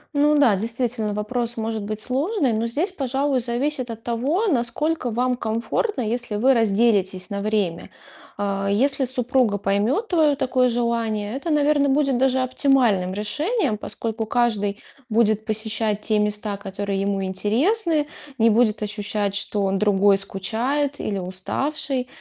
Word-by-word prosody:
Ну 295 +1 +4
да, 235 -8 +5
действительно, 225 0 -2
вопрос 235 +2 -2
может 220 0 -2
быть 210 +1 -4
сложный, 275 - 0
но 225 +2 0
здесь, 305 - -1
пожалуй, 275 -3 0
зависит 250 +2 -2
от 225 0 -7
того, 270 - 0
насколько 295 - 0
вам 250 +2 0
комфортно, 230 - -2
если 235 -1 -2
вы 260 +6 +4
разделитесь 205 -4 +2
на 200 0 -2
время. 205 -5 -1 0.5
А, 200 -1 -1
если 270 +6 +2
супруга 250 -3 +1
поймёт 205 - 0
твое 315 -5 +3
такое 255 -2 +1
желание- 230 -2 -1
это, 280 +5 -4
наверное, 295 -1 +3
будет 275 -2 +2
даже 260 0 +2
оптимальным 250 -8 +2
решением, 280 - 0
поскольку 225 0 -4
каждый 215 -4 +1 0.3
будет 220 -1 +2
посещать 215 -1 -2
те 215 0 +1
места, 210 0 -1
которые 195 0 -3
ему 195 -1 -1
интересны, 295 - +1 0.3
не 230 -1 +4
будет 220 -1 +2
ощущать, 205 -1 -2
что 200 0 -1
он 195 0 0
другой, 200 -1 +4
скучает 240 +10 -1
или 200 - -2
уставший. 255 +9 -3
230 Hz, 140 wpm, -22 LUFS, 210-270 Hz, 0.5 s, да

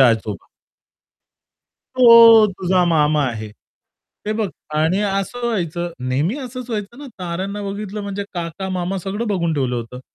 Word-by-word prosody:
आजोबा. 110 -6 +2 1.5
तो 230 -3 +8
तुझा 185 0 +1
मामा 150 -3 +2
आहे. 110 -3 -4 0.8
हे 215 - 0
बघ 215 -2 -1 0.3
आणि 160 +6 +2
असं 195 +4 -2
व्हायचं 175 -6 -2 0.2
नेहमी 150 - 0
असंच 255 -2 -7
व्हायचं 215 +2 -5
ना 290 - -9
ताऱ्यांना 190 +4 -4
बघितलं 200 +1 -5
म्हणजे 200 0 -4
काका-मामा 180 +2 -3
सगळं 200 +6 -4
बघून 170 -5 0
ठेवलं 130 -4 -1
होतं. 120 +2 -7
190 Hz, 130 wpm, -20 LUFS, 160-210 Hz, 1.5 s, तो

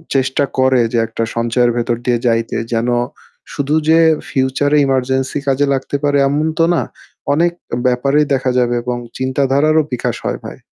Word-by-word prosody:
চেষ্টা 135 +1 +1 0.2
করে 130 -1 +4
যে - - +1
একটা 115 0 -3
সঞ্চয়ের 120 +1 +1
ভেতর 120 0 0
দিয়ে 120 -1 +2
যাইতে। 115 0 0 0.2
যেন 115 +2 0 0.6
শুধু 145 +1 -1
যে 165 +1 +6 0.3
future 135 +2 0
emergency 130 +1 0
কাজে 135 +1 +2
লাগতে 135 +1 -3
পারে 145 0 +2
এমন 150 +2 0
তো 165 - +5
না, - - +1 0.5
অনেক 170 +4 +2 0.4
ব্যাপারেই 140 +4 +2
দেখা 130 -1 0
যাবে 120 0 +1
এবং 125 0 -2 0.2
চিন্তাধারারও 140 +4 +2
বিকাশ 125 - -2
হয় - - -2
ভাই। - - -8
130 Hz, 155 wpm, -16 LUFS, 125-145 Hz, 0.6 s, যে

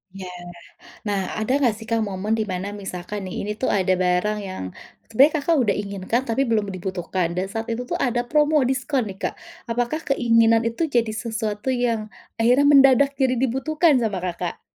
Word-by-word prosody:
Iya 185 -2 -7 0.8
nah 200 -1 0 0.2
ada 220 +4 0
gak 235 - +4
sih 225 - -10
Kak 225 -1 +1
momen 205 +3 -2
dimana 195 -3 -3
misalkan 190 +2 -6
nih 185 - -6
ini 210 - -4
tuh 260 - 0
ada 185 -2 +2
barang 180 +4 +1
yang 185 - -6 0.4
sebenernya 285 +7 +4
Kakak 330 +2 +2
udah 200 - +2
inginkan 200 +4 -2
tapi 230 +4 +1
belum 215 -4 0
dibutuhkan 185 -2 -3
dan 185 +1 -1
saat 225 +2 -4
itu 240 +2 -3
tuh - - 0
ada 240 -1 0
promo 300 0 +3
diskon 260 -3 -1
nih 190 0 -9
Kak - - -1 0.4
apakah 245 +7 -1
keinginan 230 -3 +4
itu 230 +9 -2
jadi 235 -7 0
sesuatu 220 0 -3
yang 230 -4 -1 0.2
akhirnya 245 +5 +4
mendadak 275 -1 +6
jadi 260 -1 +2
dibutuhkan 275 +4 +2
sama 215 -6 -1
Kakak? 180 -1 -4
225 Hz, 175 wpm, -23 LUFS, 195-255 Hz, 0.8 s, mendadak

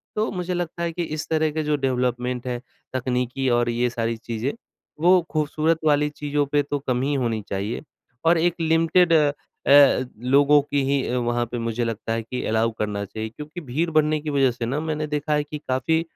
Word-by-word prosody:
तो 215 +1 0
मुझे 180 -1 -3
लगता 175 -1 -3
है 170 - -1
कि 175 - -2
इस 155 - -5
तरह 155 -1 +2
के 155 +1 -2
जो 150 0 +1
डेवलपमेंट 125 -2 -1
है, 125 -1 -2 0.3
तकनीकी 125 +1 -1
और 120 0 +2
ये 120 +1 +1
सारी 115 -1 -2
चीज़ें, 115 +3 -3 0.5
वो 180 +2 +6
खूबसूरत 155 +1 +1
वाली 150 -1 +3
चीज़ों 145 0 -1
पे 145 0 +3
तो 145 +1 -3
कम 125 -2 -1
ही 140 +2 0
होनी 120 -5 0
चाहिए। 100 +4 -3 0.4
और 165 +1 +5
एक 170 +1 +2
लिमिटेड 165 +2 +3
अ, 145 -3 +4
लोगों 140 +4 +5
की 145 0 -1
ही, 135 -2 0
वहाँ 120 -1 0
पे 120 - -3
मुझे 115 +1 -2
लगता 115 -1 -3
है 115 - -1
कि 125 +3 -5
अलाउ 110 +1 +1
करना 105 -1 -2
चाहिए। 110 +3 -5
क्योंकि 150 +8 -9
भीड़ 155 +5 -1
बढ़ने 155 0 +2
की 155 - -4
वजह 135 -3 +3
से 120 0 -4
ना, 135 +5 -1
मैंने 155 -1 -2
देखा 150 0 -1
है 150 0 +2
कि 150 +1 -7
काफ़ी 130 +6 +1
140 Hz, 200 wpm, -23 LUFS, 120-155 Hz, 0.5 s, वो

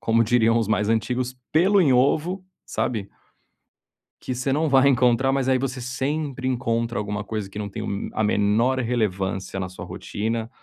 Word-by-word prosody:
como 115 0 +3
diriam 115 0 +3
os 110 -3 -1
mais 105 -1 +1
antigos, 125 +3 -1 0.2
pelo 190 +5 +4
em 140 -7 +4
ovo, 160 +9 +1 0.2
sabe 105 -5 -2 1.2
que 130 - -3
você 135 +2 -1
não 155 +1 +1
vai 135 0 +5
encontrar, 125 0 +3
mas 135 -1 0
aí 130 - +4
você 130 -1 -3
sempre 135 +1 -3
encontra 115 -2 -1
alguma 105 0 -3
coisa 105 -1 -4
que 100 - -10
não 105 -1 -3
tem 95 - -6
o 100 0 -3
a 110 - 0
menor 105 +5 +2
relevância 95 -5 -1
na 95 - -2
sua 90 - -9
rotina. 115 +2 -4
120 Hz, 175 wpm, -24 LUFS, 105-130 Hz, 1.2 s, vai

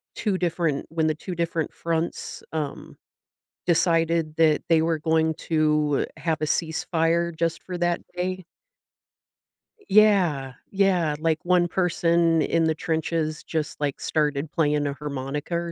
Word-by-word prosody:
2 205 -4 0
different 170 -5 -1
when 160 -1 0
the 155 - +1
2 180 +4 -6
different 170 -2 -2
fronts, 165 0 -3
um, 150 -3 -4 0.7
decided 165 -2 +2
that 155 -2 +3
they 165 -1 +5
were 165 0 +1
going 160 +1 +1
to 150 -3 +1
have 160 -2 -1
a - - +1
ceasefire 165 +1 0
just 165 0 -1
for 180 -1 -5
that 175 0 0
day 185 +1 -3 1.5
Yeah. 180 -11 +4 0.2
Yeah, 185 -6 +2
like, 160 0 +1
one 175 -1 +3
person 170 -2 +2
in 165 +1 +1
the 160 -1 +1
trenches 160 -1 -2
just, 155 -2 -3
like, 145 -2 -2
started 150 -1 0
playing 150 -2 +1
a 140 - -2
harmonica 145 +2 -4
or 170 0 -2
165 Hz, 135 wpm, -25 LUFS, 155-170 Hz, 1.5 s, they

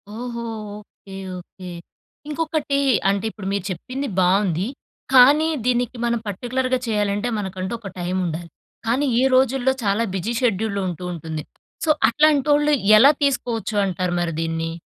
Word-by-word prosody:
ఓహో! 235 +2 -5 0.3
Okay. 205 -2 -14 0.2
Okay. 180 +1 -11 0.6
ఇంకొకటి 310 -2 -1 0.3
అంటే 200 +1 0
ఇప్పుడు 200 -3 -8
మీరు 200 -2 -1
చెప్పింది 255 +10 -4
బావుంది. 185 0 +2 0.5
కానీ 280 +5 +7 0.2
దీనికి 245 0 0
మనం 235 0 +1
పర్టిక్యులర్‌గా 255 +5 -1
చేయాలంటే 205 0 0
మనకంటూ 190 0 -4
ఒక 205 -2 -8
టైమ్ 180 +1 -1
ఉండాలి. 170 0 -4 0.4
కానీ 255 +6 +2 0.2
ఈ - - +3
రోజుల్లో 265 0 +3
చాలా 205 +2 +1
బిజి 200 +5 -2
షెడ్యూ‌ల్‌ 220 -3 0
ఉంటూ 180 0 -5
ఉంటుంది. 160 -2 -5 0.4
సో, - - -1 0.2
అట్లాంటోళ్ళు 295 +2 +3 0.3
ఎలా 275 +6 +8
తీసుకోవచ్చు 235 -6 -1
అంటారు 180 -1 -2
మరి 170 -1 -1
దీన్ని? 165 0 -2
215 Hz, 135 wpm, -22 LUFS, 185-255 Hz, 0.6 s, ఎలా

